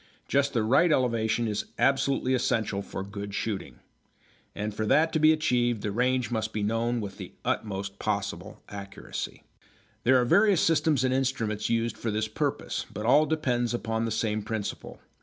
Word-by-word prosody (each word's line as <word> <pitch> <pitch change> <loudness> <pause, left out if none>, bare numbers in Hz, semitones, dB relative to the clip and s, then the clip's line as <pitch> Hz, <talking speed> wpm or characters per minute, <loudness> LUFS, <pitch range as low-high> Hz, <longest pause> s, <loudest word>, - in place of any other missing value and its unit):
Just 140 0 +1
the 115 - +1
right 135 +10 +4
elevation 115 -4 +1
is 105 -1 -2
absolutely 135 -1 +2
essential 110 -5 0
for 95 - -6
good 100 0 -6
shooting. 105 -3 -4 0.7
And 105 0 -3
for 110 +1 -2
that 160 +6 +3
to 160 - +2
be 155 +1 +6
achieved 120 -8 +1
the 105 - -1
range 125 +3 +1
must 110 -1 -2
be 105 - -1
known 115 +2 0
with 100 -2 -7
the - - -8
utmost 100 -1 -2
possible 100 -2 -3
accuracy. 100 -1 -7 0.6
There 130 +1 +5
are 125 - +2
various 200 - +4
systems 155 -4 +3
and 130 0 +2
instruments 115 -5 -1
used 115 0 0
for 115 - -2
this 110 0 -1
purpose, 110 - -2
but 105 +2 -5
all 150 +6 +5
depend 120 -6 0
upon 115 -1 -2
the - - -1
same 110 0 0
principle. 105 -1 -5
115 Hz, 170 wpm, -27 LUFS, 105-130 Hz, 0.7 s, be